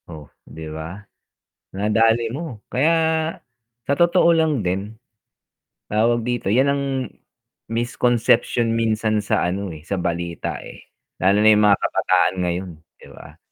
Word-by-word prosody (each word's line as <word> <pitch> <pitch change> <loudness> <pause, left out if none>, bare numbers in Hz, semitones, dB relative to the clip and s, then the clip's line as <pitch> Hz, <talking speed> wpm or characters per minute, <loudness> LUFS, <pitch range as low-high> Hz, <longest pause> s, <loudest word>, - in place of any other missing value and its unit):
Oh, 80 -3 -9 0.2
'di 80 - -9
ba? 80 +4 -7 0.8
Nadali 115 +3 +2
mo, 145 -6 -6
kaya 140 +6 +2 1.0
sa 140 - +2
totoo 170 0 +4
lang 155 -7 +1
din, 95 +4 -3 1.0
tawag 115 +2 +2
dito, 120 -2 -3
'yan 130 +5 +3
ang 140 0 -1 0.9
misconception 120 0 +1
minsan 110 -1 0
sa 100 -3 0
ano, 95 +2 -3
eh, 75 -1 -13
sa - - -2
balita, 85 -1 -3
eh. - - -13 0.3
Lalo 95 +2 +4
na 110 - +6
'yong 105 0 +3
mga 100 -1 +5
kabataan - - +1
ngayon, 90 +1 -2 0.3
'di - - -15
ba? - - -14
110 Hz, 135 wpm, -21 LUFS, 95-120 Hz, 1.0 s, na